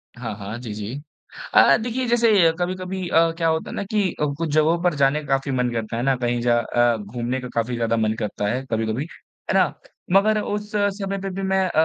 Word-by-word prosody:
हाँ, 115 Hz, -3 st, -5 dB
हाँ, 105 Hz, +2 st, -6 dB
जी, 115 Hz, -4 st, -6 dB
जी। 105 Hz, +2 st, -5 dB, 0.6 s
अ, -, -, +7 dB
देखिए 245 Hz, +2 st, -2 dB
जैसे 235 Hz, -1 st, +3 dB, 0.3 s
कभी-कभी 185 Hz, +1 st, -3 dB
अ, 165 Hz, 0 st, +4 dB
क्या 165 Hz, -, +1 dB
होता 160 Hz, 0 st, 0 dB
है -, -, -6 dB
ना -, -, -2 dB
कि 200 Hz, -1 st, 0 dB
अ, -, -, +3 dB
कुछ 165 Hz, -1 st, -2 dB
जगहों 155 Hz, +2 st, +3 dB
पर 180 Hz, -2 st, +3 dB
जाने 140 Hz, +2 st, +2 dB
काफ़ी 135 Hz, 0 st, 0 dB
मन 125 Hz, -1 st, +1 dB
करता 115 Hz, -1 st, -3 dB
है, 120 Hz, -, -1 dB
है -, -, -1 dB
ना? 135 Hz, -1 st, +3 dB
कहीं 120 Hz, -1 st, -1 dB
ज 120 Hz, -, -3 dB
अ, 120 Hz, 0 st, +2 dB
घूमने 120 Hz, +5 st, -4 dB
का 125 Hz, -, -6 dB
काफ़ी 115 Hz, +1 st, -1 dB
ज़्यादा 115 Hz, -1 st, 0 dB
मन 110 Hz, -1 st, +1 dB
करता 105 Hz, -2 st, -2 dB
है 125 Hz, +5 st, -1 dB
कभी-कभी, 110 Hz, +4 st, -1 dB, 0.5 s
है -, -, +1 dB
ना? -, -, +3 dB, 0.4 s
मगर 215 Hz, +2 st, +4 dB
उस 210 Hz, 0 st, -4 dB
समय 200 Hz, -1 st, -1 dB
पे 195 Hz, -, -3 dB
भी 190 Hz, +1 st, -5 dB
मैं 190 Hz, 0 st, +2 dB
अ, -, -, -4 dB
135 Hz, 230 wpm, -22 LUFS, 120-190 Hz, 0.6 s, अ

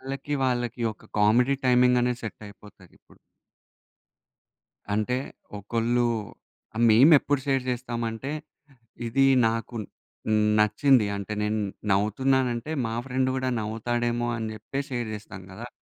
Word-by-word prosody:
వాళ్ళకి 135 Hz, +2 st, -4 dB
వాళ్ళకి 120 Hz, -2 st, -1 dB
ఒక 110 Hz, -, -20 dB
కామెడీ 125 Hz, +6 st, +4 dB
టైమింగ్ 125 Hz, 0 st, +4 dB
అనేది 125 Hz, 0 st, -1 dB
సెట్ 110 Hz, -, -7 dB
అయిపోతది 100 Hz, -2 st, -17 dB
ఇప్పుడు. -, -, -23 dB, 1.8 s
అంటే 110 Hz, +4 st, 0 dB, 0.4 s
ఒకళ్ళు 115 Hz, +3 st, 0 dB, 0.9 s
మేమెప్పుడు 140 Hz, +4 st, +5 dB
షేర్ 135 Hz, -2 st, +1 dB
చేస్తామంటే 120 Hz, 0 st, -4 dB, 0.8 s
ఇది 135 Hz, +4 st, +2 dB, 0.2 s
నాకు 115 Hz, +1 st, -4 dB, 0.8 s
నచ్చింది 105 Hz, +3 st, +4 dB
అంటే 100 Hz, +1 st, -5 dB
నేను 105 Hz, +1 st, 0 dB, 0.3 s
నవ్వుతున్నాను 125 Hz, +7 st, +2 dB
అంటే, 120 Hz, +6 st, -6 dB, 0.2 s
మా 115 Hz, -, -3 dB
ఫ్రెండ్ 130 Hz, 0 st, 0 dB
కూడా 130 Hz, 0 st, -1 dB
నవ్వుతాడేమో 120 Hz, +2 st, -1 dB
అని 110 Hz, -1 st, -3 dB
చెప్పేసి 135 Hz, +5 st, -5 dB
షేర్ 120 Hz, -2 st, -2 dB
చేస్తాం 100 Hz, -3 st, -9 dB
కదా! 110 Hz, +6 st, -8 dB
120 Hz, 115 wpm, -26 LUFS, 110-130 Hz, 1.8 s, మేమెప్పుడు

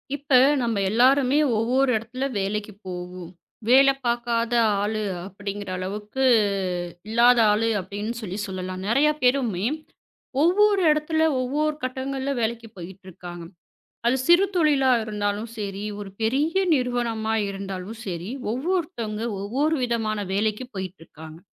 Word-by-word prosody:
இப்ப 285 Hz, 0 st, -11 dB, 0.3 s
நம்ம 230 Hz, -3 st, 0 dB
எல்லாருமே 260 Hz, +4 st, +4 dB, 0.2 s
ஒவ்வொரு 255 Hz, +4 st, +2 dB
இடத்துல 250 Hz, +4 st, -4 dB
வேலைக்குப் 205 Hz, +1 st, -4 dB
போவோம். 180 Hz, -1 st, -7 dB, 0.4 s
வேலை 275 Hz, +2 st, +7 dB
பாக்காத 235 Hz, 0 st, 0 dB, 0.3 s
ஆளு 215 Hz, +1 st, -1 dB, 0.2 s
அப்டிங்கிற 200 Hz, +1 st, -6 dB
அளவுக்கு 210 Hz, +7 st, -4 dB, 0.9 s
இல்லாத 240 Hz, +2 st, +5 dB
ஆளு 225 Hz, +2 st, +1 dB
அப்டின்னு 210 Hz, +5 st, -5 dB
சொல்லிச் 205 Hz, 0 st, -4 dB
சொல்லலாம். 185 Hz, -1 st, -5 dB
நிறைய 275 Hz, +7 st, +4 dB
பேருமே 245 Hz, -7 st, +1 dB, 0.8 s
ஒவ்வொரு 400 Hz, +3 st, +4 dB
இடத்துல 305 Hz, +1 st, 0 dB, 0.2 s
ஒவ்வொரு 300 Hz, +4 st, 0 dB
கட்டங்கள்ல 265 Hz, +1 st, -3 dB
வேலைக்குப் 225 Hz, 0 st, -3 dB
போயிட்டு 185 Hz, +2 st, -10 dB
இருக்காங்க. 175 Hz, -1 st, -9 dB, 0.6 s
அது 245 Hz, +2 st, +3 dB
சிறுதொழில 345 Hz, -6 st, +4 dB, 0.2 s
இருந்தாலும் 210 Hz, +1 st, -2 dB
சரி, 200 Hz, -1 st, -4 dB, 0.2 s
ஒரு 200 Hz, -1 st, -7 dB
பெரிய 280 Hz, +9 st, +1 dB, 0.2 s
நிறுவனமா 240 Hz, -4 st, -1 dB, 0.2 s
இருந்தாலும் 195 Hz, +2 st, -6 dB
சரி. 175 Hz, +2 st, -4 dB, 0.2 s
ஒவ்வொருத்தங்க 265 Hz, -, -2 dB, 0.2 s
ஒவ்வொரு 275 Hz, +10 st, 0 dB
விதமான 225 Hz, -3 st, -1 dB
வேலைக்குப் 215 Hz, +5 st, -1 dB
போயிட்டு 190 Hz, -1 st, -6 dB
இருக்காங்க. 160 Hz, 0 st, -12 dB
225 Hz, 115 wpm, -24 LUFS, 200-265 Hz, 0.9 s, வேலை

